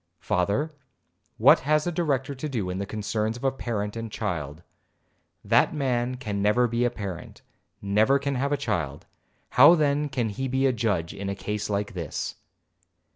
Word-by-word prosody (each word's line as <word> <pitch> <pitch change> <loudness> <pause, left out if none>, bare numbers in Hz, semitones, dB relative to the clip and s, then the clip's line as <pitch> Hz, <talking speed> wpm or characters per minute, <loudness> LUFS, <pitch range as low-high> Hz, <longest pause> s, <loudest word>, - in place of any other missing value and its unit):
'Father, 100 - 0 0.6
what 120 +6 +7
has 150 +2 +1
a 175 - 0
Director 145 -5 -1
to 145 +3 -5
do 105 -9 -2
in 90 - -4
the 100 - -3
concerns 110 +2 -2
of 120 - -12
a 135 - +3
parent 110 -5 -3
and 115 -1 -5
child? 85 - -4 0.8
That 120 +8 +3
man 125 -3 0
never 105 +4 +2
can - - -11
be 120 +1 +1
a - - +3
parent,—never 105 +3 -2
can 140 0 -2
have 140 +2 -1
a 145 - +2
child, 85 - -3 0.5
how 145 +7 +8
then 150 -1 +1
can 120 -5 -1
he 130 +6 -3
be 130 +1 +1
a 130 - +3
judge 100 -8 -1
in 100 0 -5
a 100 - -2
case 105 +1 -4
like 105 +1 -2
this?' 85 -5 -4
115 Hz, 175 wpm, -26 LUFS, 100-135 Hz, 0.8 s, how